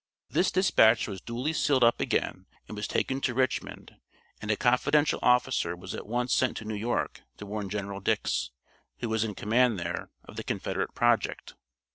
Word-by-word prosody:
This 180 - +2
dispatch 120 - +4
was 95 -4 -6
duly 125 +7 -3
sealed 140 -5 +2
up 115 0 +4
again 95 - -1 0.2
and 110 - -7
was 105 0 -3
taken 135 +1 -1
to 120 - -1
Richmond, 130 0 -2 0.4
and 105 - -6
a 110 - +3
confidential 140 +4 +2
officer 125 -8 +2
was 95 +2 -8
at - - -7
once 120 +3 0
sent 130 - +1
to 110 - -7
New 110 - -4
York 110 +4 -2 0.2
to 105 - -8
warn 105 -1 -4
General 100 0 -4
Dix, 95 - 0 0.5
who 120 - -2
was 110 -1 +1
in 105 -3 -4
command 115 +2 +2
there, 85 0 -4
of - - -13
the - - -4
Confederate - - -3
project. 120 -1 +1
115 Hz, 180 wpm, -28 LUFS, 105-125 Hz, 0.5 s, dispatch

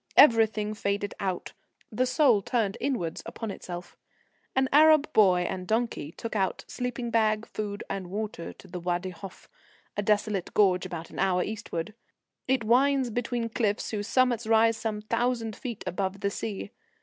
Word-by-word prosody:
Everything 220 -5 +5
faded 205 -1 -2
out. 185 -3 -3 0.4
The 255 +4 +1
soul 255 -5 +4
turned 210 -2 0
inwards 205 -13 -1
upon 225 -3 -5
itself. 175 -2 -8 0.6
An 265 0 +3
Arab 310 0 +6
boy 185 -4 +5
and 180 +1 -3
donkey 220 -8 -1
took 230 - -6
out 190 -3 -1
sleeping 245 -1 -4
bag, 215 -1 +2
food 205 -1 -5
and 190 -2 -4
water 205 -3 -4
to - - -16
the 180 0 -6
Wadi 175 +1 -2
Hof, 185 +1 -11 0.5
a 205 - 0
desolate 205 -2 0
gorge 185 -3 +4
about 170 -2 -7
an - - -8
hour 180 -1 +2
eastwards. 210 -5 -4 0.6
It 260 -2 +2
winds 260 +2 +3
between 240 0 -2
cliffs 220 -2 -1
whose 205 -1 -3
summits 240 -3 +2
rise 225 0 +4
some 220 -2 -3
thousand 230 -1 -1
feet 235 -4 -6
above 195 +2 -2
the 200 - 0
sea. 205 -1 -5
215 Hz, 160 wpm, -28 LUFS, 195-235 Hz, 0.6 s, Arab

